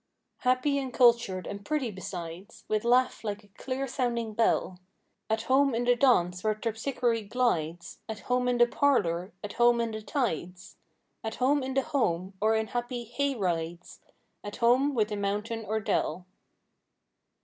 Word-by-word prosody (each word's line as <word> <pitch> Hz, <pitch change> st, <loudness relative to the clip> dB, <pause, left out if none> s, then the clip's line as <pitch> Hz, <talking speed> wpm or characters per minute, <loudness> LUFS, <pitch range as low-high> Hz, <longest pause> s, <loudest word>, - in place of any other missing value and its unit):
Happy 255 Hz, +3 st, +2 dB
and 265 Hz, -2 st, -4 dB
cultured 235 Hz, -8 st, +4 dB
and 200 Hz, 0 st, -6 dB
pretty 295 Hz, -5 st, -1 dB
besides 185 Hz, +1 st, -8 dB
With 215 Hz, -1 st, 0 dB
laugh 250 Hz, +1 st, +2 dB
like 210 Hz, -1 st, -4 dB
a 205 Hz, -, -21 dB
clear 260 Hz, +6 st, -4 dB
sounding 235 Hz, -4 st, -2 dB
bell. 210 Hz, -4 st, +1 dB, 0.5 s
At 220 Hz, 0 st, 0 dB
home 270 Hz, +1 st, +3 dB
in 235 Hz, -, 0 dB
the 245 Hz, 0 st, +4 dB
dance 180 Hz, -9 st, +3 dB
where 215 Hz, -1 st, +1 dB
Terpsichore 230 Hz, 0 st, -1 dB
glides; 175 Hz, -9 st, -1 dB
At 220 Hz, -2 st, -5 dB
home 250 Hz, 0 st, 0 dB
in 245 Hz, -1 st, +2 dB
the 240 Hz, -, +7 dB
parlor; 195 Hz, -10 st, +1 dB
at 205 Hz, -, -5 dB
home 240 Hz, 0 st, +4 dB
in 230 Hz, -1 st, -1 dB
the 215 Hz, 0 st, -5 dB
tides; 185 Hz, -, -3 dB, 0.5 s
At 220 Hz, -, -4 dB
home 280 Hz, +3 st, +2 dB
in 260 Hz, 0 st, -4 dB
the 270 Hz, -, +3 dB
home 190 Hz, -, -1 dB
or 220 Hz, +1 st, +3 dB
in 220 Hz, 0 st, +1 dB
happy 240 Hz, 0 st, -3 dB
"hay 275 Hz, +4 st, -1 dB
rides;" 175 Hz, -4 st, -3 dB, 0.4 s
At 205 Hz, 0 st, -6 dB
home 260 Hz, +4 st, +3 dB
with 215 Hz, -2 st, +2 dB
the 210 Hz, -, -3 dB
mountain 210 Hz, +3 st, -2 dB
or 220 Hz, +1 st, 0 dB
dell. 180 Hz, -4 st, -1 dB
230 Hz, 165 wpm, -28 LUFS, 200-250 Hz, 0.5 s, the